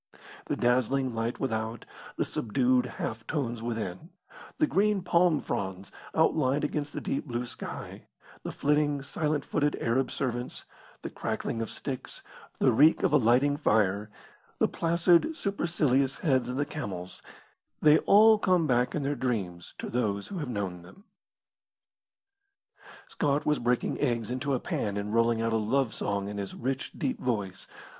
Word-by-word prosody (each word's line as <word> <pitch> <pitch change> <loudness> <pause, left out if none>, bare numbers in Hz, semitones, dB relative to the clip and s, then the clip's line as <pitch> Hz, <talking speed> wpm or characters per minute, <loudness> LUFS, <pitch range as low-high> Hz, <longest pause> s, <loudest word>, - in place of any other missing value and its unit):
The - - 0
dazzling 130 +1 +1
light 115 +1 -2
without, 110 -3 -2 0.3
the - - 0
subdued 125 +2 +1
half 115 -1 -5
tones 120 -7 -2
within, 115 - -4 0.5
the 310 - +4
green 205 -6 +1
palm 175 -3 +3
fronds 95 0 -4 0.2
outlined 150 -3 +2
against 145 0 -2
the - - -4
deep 140 - -3
blue 120 -1 -2
sky, - - -8 0.3
the - - -5
flitting, 145 -1 +1
silent 150 0 -1
footed 145 0 0
Arab 125 +3 +1
servants, 125 -2 -3 0.4
the - - -5
crackling 115 - -3
of 115 - -3
sticks, 135 -3 -6 0.3
the - - +4
reek 150 +8 +5
of - - +2
a - - +8
lighting 130 +5 +3
fire, 105 -6 +1 0.5
the - - +3
placid 170 - +2
supercilious 150 -9 +1
heads 130 -7 +2
of 125 - -3
the 145 - +1
camels, 95 - -6 0.6
they 150 0 +6
all 215 +1 +6
come 180 -4 +3
back 125 -2 +1
in 150 - -1
their 140 +1 0
dreams 105 -10 -3
to - - -5
those 105 -5 -1
who 195 - -4
have 145 -5 -4
known 95 -6 -3
them. 90 - -16 2.0
Scott 145 0 0
was 150 -1 +2
breaking 120 0 0
eggs 120 -4 0
into 135 +2 -1
a - - -1
pan 100 -4 -2
and 105 +1 -3
rolling 115 0 +2
out 115 0 0
a - - +3
love 115 +2 +1
song 100 -1 -2
in 105 0 -5
his 100 -1 -5
rich, 135 +2 -3
deep 255 - -2
voice. 100 -7 -2
125 Hz, 155 wpm, -28 LUFS, 115-150 Hz, 2.0 s, a